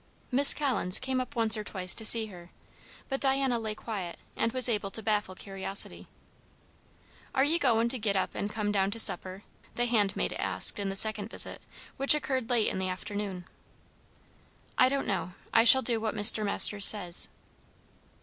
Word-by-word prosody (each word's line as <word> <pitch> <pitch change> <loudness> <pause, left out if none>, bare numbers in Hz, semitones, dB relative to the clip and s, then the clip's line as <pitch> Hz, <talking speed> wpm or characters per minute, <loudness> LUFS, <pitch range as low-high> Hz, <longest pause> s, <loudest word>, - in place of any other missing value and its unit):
Miss 275 +3 +7
Collins 245 -11 -2
came 260 0 -5
up 255 +2 -11
once 225 -1 +2
or 215 - -7
twice 185 -3 +5
to 220 - -2
see 225 0 +5
her, 180 -4 -16 0.6
but 270 -1 -6
Diana 270 -3 -2
lay 215 -1 -8
quiet, 195 -7 -9 0.2
and 230 - -4
was 255 +1 +2
able 210 -4 -5
to 220 +2 -4
baffle 210 -3 -4
curiosity. 195 0 -5 1.3
"Are 265 - 0
ye 320 +4 -2
goin' 230 -6 -1
to 255 0 -1
git 205 -2 -4
up 190 - -5
and 205 - -7
come 210 -1 -6
down 195 -1 -3
to 225 +3 -4
supper?" 185 -1 +2 0.3
the 240 - -3
handmaid 210 -5 -3
asked - - +2
in 200 -1 -6
the 195 - -8
second 215 +1 -1
visit, - - -5 0.4
which 275 +2 +4
occurred 260 -5 -6
late 235 -3 -2
in - - -6
the 185 0 -5
afternoon. 190 -1 -9 1.3
"I 255 - +1
don't 275 0 -5
know. 185 -3 -6 0.2
I 225 - +2
shall 265 +2 +6
do 230 -3 -2
what 220 0 -6
Mr. 215 +1 +4
Masters 200 0 +5
says." 180 -5 +6
215 Hz, 180 wpm, -25 LUFS, 195-245 Hz, 1.3 s, Miss